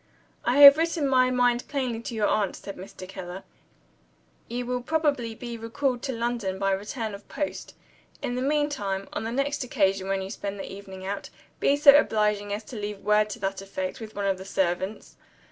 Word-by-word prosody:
"I 245 +3 +1
have 280 0 +12
written 330 -3 +1
my 255 -1 +4
mind 245 -1 +2
plainly 255 -5 -2
to 235 - -6
your 215 -2 +1
aunt," 205 -2 +1
said 200 - -8
Mr. 185 0 -10
Keller; 185 0 -7 1.0
"you 245 +1 -3
will 250 0 -2
probably 280 -5 0
be 235 0 -7
recalled 245 +2 -1
to 270 - -3
London 230 -5 -2
by 195 0 +1
return 210 +3 -3
of 200 0 -11
post. 295 -2 -4 0.4
In 245 - -3
the 250 - -2
meantime, 270 -9 -1
on 220 - -3
the 225 - -3
next 275 +3 -1
occasion 195 -5 +1
when 195 0 0
you 190 - -6
spend 200 -2 -5
the - - -6
evening 190 -1 -9
out, 200 +1 -4 0.3
be 280 - +3
so 285 -1 +9
obliging 210 -6 +2
as 205 +2 -3
to 245 - -10
leave 205 -1 -5
word 210 0 +3
to - - -6
that 195 0 -2
effect 190 -1 -4
with 220 -2 -9
one 200 0 -2
of 195 -1 0
the - - -7
servants." 190 +1 -2
215 Hz, 195 wpm, -26 LUFS, 195-250 Hz, 1.0 s, have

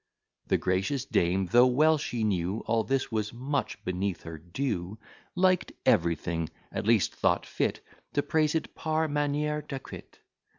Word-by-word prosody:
The - - +3
gracious 95 +9 0
dame, 90 +3 +1
though 120 +1 +7
well 155 +5 +4
she 120 -5 -2
knew 95 0 0
All 115 -1 +2
this 135 0 -1
was 110 -1 -1
much 135 +4 -3
beneath 90 0 -2
her 80 -1 -7
due, 90 - -3 0.4
Liked 185 0 +2
everything 85 -1 +1 0.2
at 105 - -3
least 115 -4 +3
thought - - +1
fit - - -1 0.3
To 145 - +1
praise 155 -1 +1
it 160 - -2
par 160 0 0
manière 150 +1 0
d'acquit. 135 -3 -9
120 Hz, 145 wpm, -28 LUFS, 95-145 Hz, 0.4 s, though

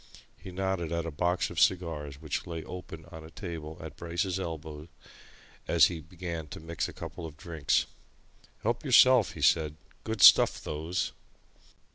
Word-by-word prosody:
He 95 +1 -10
nodded 95 -3 -2
at 85 -1 -1
a 85 - -4
box 90 +5 0
of 85 - -3
cigars 75 -6 +1
which 75 -3 -4
lay 80 -2 -5
open 80 -3 -9
on 80 -2 -9
a 80 - -11
table 80 -2 -7
at 80 -2 -8
Bryce's 85 +2 -2
elbow 80 -3 -6 0.8
as - - +5
he 80 - -6
began 85 -1 -6
to - - -8
mix 80 -1 -3
a - - -7
couple 85 - -7
of 75 -2 -13
drinks. 80 -3 0 0.8
"Help 115 +2 0
yourself," 130 -4 +6
he - - -6
said. 75 -2 +3 0.3
"Good 110 -1 -1
stuff, - - +8
those." 80 +4 -3
85 Hz, 160 wpm, -29 LUFS, 80-90 Hz, 0.8 s, stuff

